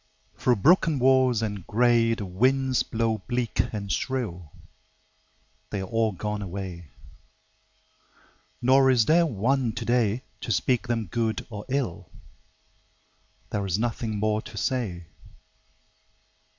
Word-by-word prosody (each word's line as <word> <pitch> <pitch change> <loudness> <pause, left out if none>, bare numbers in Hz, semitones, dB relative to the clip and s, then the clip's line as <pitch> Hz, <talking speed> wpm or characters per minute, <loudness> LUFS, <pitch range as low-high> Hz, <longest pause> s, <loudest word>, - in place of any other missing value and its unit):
Through 125 - +2
broken 160 - +4
walls 130 -3 +3
and 100 -5 -4
gray 115 0 +3
The 110 -3 -5
winds 130 +7 +1
blow 110 -1 -1
bleak 120 -2 -2
and 100 -3 -4
shrill: 90 - -3 1.2
They 100 - -3
are - - -3
all 115 +2 0
gone 105 +2 -4
away. 90 -3 -6 1.8
Nor 135 +2 +5
is 120 -4 +4
there 170 +4 +4
one 125 0 0
today 120 0 0 0.2
To - - -4
speak 125 -1 +1
them 115 -2 -1
good 110 +4 -2
or 105 -1 -7
ill: 130 -10 -2 1.4
There 100 - -1
is 95 -1 -1
nothing 115 -1 -2
more 110 +1 0
to 105 - -11
say. 100 -9 -2
115 Hz, 120 wpm, -26 LUFS, 105-125 Hz, 1.8 s, Nor